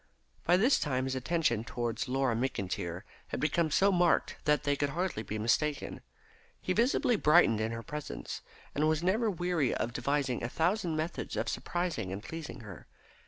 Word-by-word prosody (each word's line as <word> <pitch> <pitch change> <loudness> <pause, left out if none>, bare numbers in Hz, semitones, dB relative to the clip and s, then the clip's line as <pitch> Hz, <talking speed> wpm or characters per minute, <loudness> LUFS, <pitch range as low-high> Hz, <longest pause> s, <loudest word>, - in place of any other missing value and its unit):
By 175 +1 +5
this 240 +8 +4
time 130 -3 0
his 130 0 -2
attentions 130 -4 0
towards 120 0 -2
Laura 135 -1 +1
McIntyre 95 -7 -2 0.2
had - - -4
become 155 +3 +1
so 195 +6 +4
marked 175 -2 +2
that 150 -2 +3
they 145 -1 +2
could 145 0 0
hardly 170 - -2
be 110 0 -4
mistaken. 140 +7 0 0.6
He - - -1
visibly 240 -1 +3
brightened 150 - +5
in 110 +1 -1
her 115 0 -5
presence, 150 +3 -6 0.3
and 155 +2 +2
was 155 +1 +1
never 215 +5 +2
weary 175 - 0
of 120 - -2
devising 130 0 0
a 120 - -1
thousand 175 +3 0
methods 155 +2 -3
of - - -1
surprising 175 - -2
and 100 +2 -5
pleasing 160 -5 -7
her. 100 -6 -11
145 Hz, 170 wpm, -31 LUFS, 120-175 Hz, 0.6 s, By